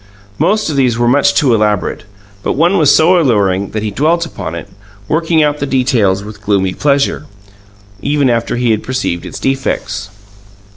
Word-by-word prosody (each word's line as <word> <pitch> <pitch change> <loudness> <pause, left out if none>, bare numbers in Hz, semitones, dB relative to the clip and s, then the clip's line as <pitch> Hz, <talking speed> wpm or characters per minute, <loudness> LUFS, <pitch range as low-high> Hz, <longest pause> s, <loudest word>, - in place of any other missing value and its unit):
Most 215 +3 +1
of 155 - -2
these 125 -4 +2
were 120 0 +1
much 140 +3 +3
too 140 -5 +3
elaborate; 105 0 0 0.4
but - - -1
one 175 +6 +2
was 150 -4 +4
so 175 +3 +4
alluring 100 - +1
that 110 -1 -4
he 105 - -2
dwelt 165 +9 +1
upon 90 - -6
it, 85 - -7 0.4
working 160 0 +1
out 150 0 0
the 145 - -2
details 120 -8 +1
with 105 0 -10
gloomy 100 -3 0
pleasure, 140 +1 0 0.7
even 145 -1 +1
after 115 -1 0
he 120 -1 +1
had 110 -1 0
perceived 125 -9 -3
its - - -8
defects. 105 -7 -2
125 Hz, 175 wpm, -14 LUFS, 105-150 Hz, 0.7 s, was